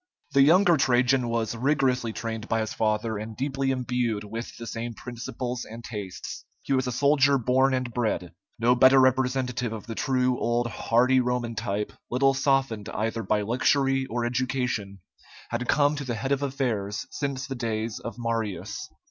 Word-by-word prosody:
The 140 - +6
younger 170 +4 +6
Trajan 125 -1 +3
was 115 0 -1
rigorously 130 -2 +1
trained 110 0 -5
by 115 -1 +1
his 110 - -3
father, 110 0 0
and 110 0 -7
deeply 135 0 -1
imbued 125 -4 -1
with 115 +3 -7
the 115 - -7
same 115 0 -5
principles 125 +1 -5
and 115 +1 -10
tastes. 100 -6 -6 0.2
He 140 - -1
was 130 -1 +1
a - - -1
soldier 140 +2 +4
born 130 +2 +3
and 125 -2 -3
bred. 110 -8 -1 0.2
No 120 +2 +4
better 130 +2 +6
representative 130 -2 +1
of 110 -2 -6
the 115 - -5
true 125 0 +1
old 120 +1 +1
hardy 120 +3 +2
Roman 125 -1 -1
type, 105 -2 -3 0.2
little 135 +2 +3
softened 135 -6 0
either 115 +1 -2
by 105 0 +1
luxury 135 +4 +2
or 120 +1 -2
education, 125 -6 -2 0.5
had 120 +1 -2
come 145 0 +3
to 145 - -3
the 120 -3 -3
head 135 +6 -3
of 140 0 +1
affairs 115 -8 -2
since 140 -2 -3
the 135 - -5
days 115 -2 -3
of 115 - -6
Marius. 115 -4 -3
125 Hz, 170 wpm, -26 LUFS, 115-130 Hz, 0.5 s, The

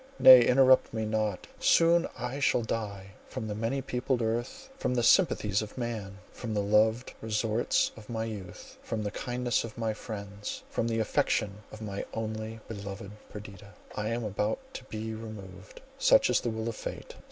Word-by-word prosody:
—nay, 130 -2 +10
interrupt 130 +1 +5
me 110 0 -1
not—soon 110 - +2
I 125 +3 -4
shall 125 -3 +2
die. 100 -4 -4 0.2
From 110 - -5
the 105 - -3
many 115 +6 -2
peopled 125 -1 -1
earth, 120 - -2
from 125 - -1
the 120 - +1
sympathies 105 - +4
of 110 +2 -8
man, 110 -5 -4
from 110 -3 -5
the 105 - +1
loved 110 +4 +2
resorts 110 +1 +1
of 110 0 -13
my 110 -1 -2
youth, 100 -5 -8
from 110 -1 -3
the 105 - -2
kindness 120 +2 -1
of 115 -1 -8
my 110 -2 -1
friends, 100 -2 -6
from 115 - 0
the 115 -1 0
affection 105 -2 0
of 110 0 -9
my 100 -2 -4
only 110 0 -4
beloved 100 -2 -7 0.2
Perdita, 100 -1 -10 0.2
I 105 0 -2
am 115 +1 -2
about 105 0 -1 0.2
to - - -7
be 110 -1 -5
removed. 100 -5 -9 0.2
Such - - +5
is - - +3
the 120 - -1
will 110 0 -3
of 115 - -3
fate! - - -7
110 Hz, 175 wpm, -29 LUFS, 105-120 Hz, 0.2 s, nay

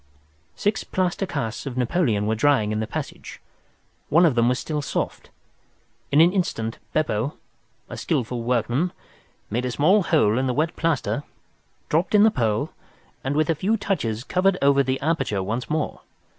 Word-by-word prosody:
Six 210 - 0
plaster 185 +1 -1
casts 130 -6 -4
of 130 -2 -5
Napoleon 120 - +1
were 110 - +1
drying 110 -3 +2
in 110 - -1
the 110 - -2
passage. - - -6 0.7
One 170 +4 +5
of 160 - +4
them 120 0 +3
was 125 - +1
still 150 -2 -3
soft. - - -3 0.8
In 145 - +4
an 175 +2 +5
instant 115 - -2
Beppo, 140 -3 -1 0.5
a - - -7
skilful 120 -1 -2
workman, 125 +7 0 0.6
made 120 +4 0
a 125 - -1
small 170 - +4
hole 130 - +2
in 130 - 0
the 125 - -1
wet 160 +3 0
plaster, 155 -4 0 0.7
dropped 170 +7 +1
in 205 - +7
the 220 - +6
pearl, 110 - 0 0.5
and 135 +2 -1
with 155 +1 +2
a - - +3
few 200 +8 0
touches 120 - -2
covered 185 +5 +2
over 140 0 +4
the 130 0 -1
aperture 140 - 0
once 115 +5 -3
more. 155 0 -2
140 Hz, 170 wpm, -24 LUFS, 115-170 Hz, 0.8 s, in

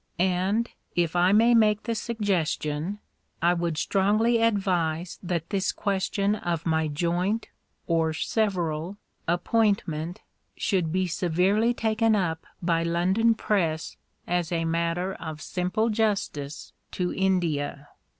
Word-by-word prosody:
And, 190 +5 +1 0.3
if 170 -1 +1
I 175 +1 +4
may 230 +4 +5
make 215 -2 +4
the 230 - -1
suggestion, 190 -6 -1 0.4
I 175 +1 +3
would 170 -2 -1
strongly 215 +6 +2
advise 180 -6 0
that 170 -3 -3
this 195 -1 +1
question 200 +1 0
of 175 -6 -2
my 160 -1 +1
joint 175 +8 -1 0.4
(or 165 -1 +1
several) 175 -1 -1 0.3
appointment 175 -3 0 0.4
should 180 -5 0
be 185 +2 +1
severely 185 +7 +1
taken 225 0 +2
up 165 -5 -1 0.2
by 165 -1 +2
London 185 +7 +2
Press 165 -8 -1 0.3
as 175 -1 -1
matter 170 +2 0
of 160 -2 -6
simple 185 +7 -1
justice 195 -10 -2 0.2
to 180 -1 -1
India. 160 -7 0
180 Hz, 115 wpm, -26 LUFS, 165-205 Hz, 0.4 s, may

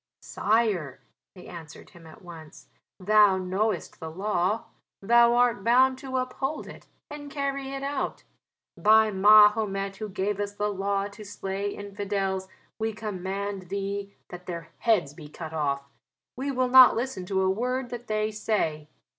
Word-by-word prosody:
"Sire," 205 - 0 0.4
they 180 - -13
answered 160 -3 -11
him 165 -2 -15
at 160 - -15
once, 165 -3 -13 0.3
"thou 205 0 +5
knowest 190 +4 -2
the 160 - -6
law: 190 +3 -1 0.4
thou 235 +3 +4
art 240 -5 +2
bound 255 +3 +4
to 260 -1 -4
uphold 265 +3 -3
it - - -12 0.2
and 290 -1 -8
carry 275 -1 -3
it 275 0 -5
out. 280 +1 -3 0.5
By 220 0 +4
Mahomet 205 -1 +4
who 215 0 -5
gave 195 +1 -2
us 205 0 -3
the 205 0 -1
law 200 +1 -1
to 210 +1 -12
slay 195 0 -4
infidels, 195 -1 -3 0.3
we 220 0 -1
command 200 -2 -5
thee 200 0 -4 0.2
that 180 0 -10
their 170 -2 -6
heads 205 -11 +1
be 150 -1 -11
cut 160 +1 -8
off. 140 -3 -1 0.5
We 270 +3 -3
will 255 -2 0
not 260 0 +8
listen 230 -7 -4
to 190 0 0
a 190 - +2
word 250 +4 -2
that 240 -1 -7
they 215 0 -1
say. 180 -8 -2
205 Hz, 155 wpm, -26 LUFS, 190-230 Hz, 0.5 s, not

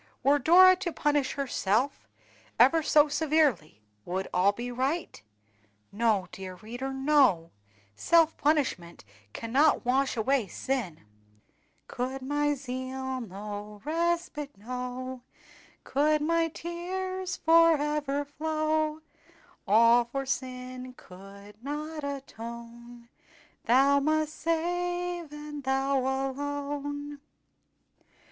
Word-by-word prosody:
Were 285 +2 +4
Dora 370 +6 +7
to 360 -2 -3
punish 290 -3 0
herself 255 - -1 0.5
ever 275 +7 +6
so 300 -1 +4
severely, 290 - +1 0.2
would 190 - -3
all 185 +3 +4
be 240 +4 -6
right? 265 - -2 0.7
No, 210 -3 +1
dear 190 -1 -8
reader, 240 +7 -6
no! 265 - +3 0.4
self 325 - +3
punishment 255 - -1 0.3
cannot 260 - +2
wash 265 +1 +1
away 245 0 +1
sin. 225 -7 -3 0.9
"Could 260 +2 -4
my 290 +2 0
zeal 260 0 -5
no 205 0 -7
respite 330 - -2
know, 250 +3 -6 0.6
Could 300 +2 +2
my 330 +1 +2
tears 365 +3 -4
forever 300 -3 +3
flow, 310 +1 -1 0.7
All 230 +3 +5
for 270 +3 -4
sin 255 -1 -5
could 200 +3 -14
not 300 +2 -5
atone, 235 -3 -8 0.6
Thou 275 +4 +5
must 310 +1 0
save, 350 +1 -2
and 295 -1 -8
Thou 270 +1 +1
alone." 285 +2 -3
275 Hz, 95 wpm, -28 LUFS, 240-305 Hz, 0.9 s, Dora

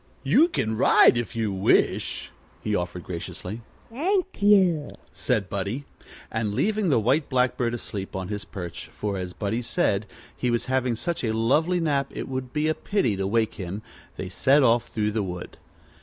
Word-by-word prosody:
"You 325 - +5
can 110 - -1
ride 120 - +6
if 120 0 -3
you 110 -3 -1
wish," 95 0 +1 0.3
he 105 - -1
offered 90 -2 -2
graciously. 90 +4 -6 0.3
"Thank 370 - -1
you," 185 -7 +4 0.2
said 110 -7 0
Buddie. 100 +9 -3 0.5
And 110 -2 -1
leaving 210 - +1
the 140 - +4
White 130 +8 +1
Blackbird 125 -2 +1
asleep 100 -5 -6
on 95 -1 -3
his 105 0 -4
perch, 90 -1 -7
for, 105 -1 -4
as 90 -1 -5
Buddie 110 +4 -2
said, 110 - 0 0.3
he 125 - -1
was 120 -1 0
having 130 -2 +1
such 170 +7 -3
a 110 -2 0
lovely 155 +11 +2
nap 145 -4 +1
it - - -6
would 130 -1 -4
be 150 +2 0
a 155 - +3
pity 155 - 0
to 95 0 -1
wake 110 +1 +1
him, 95 +4 -5 0.3
they 95 - -4
set 135 +9 +3
off 120 -1 +3
through 105 -1 -1
the 110 0 0
wood. 90 -2 -6
115 Hz, 175 wpm, -25 LUFS, 100-145 Hz, 0.5 s, ride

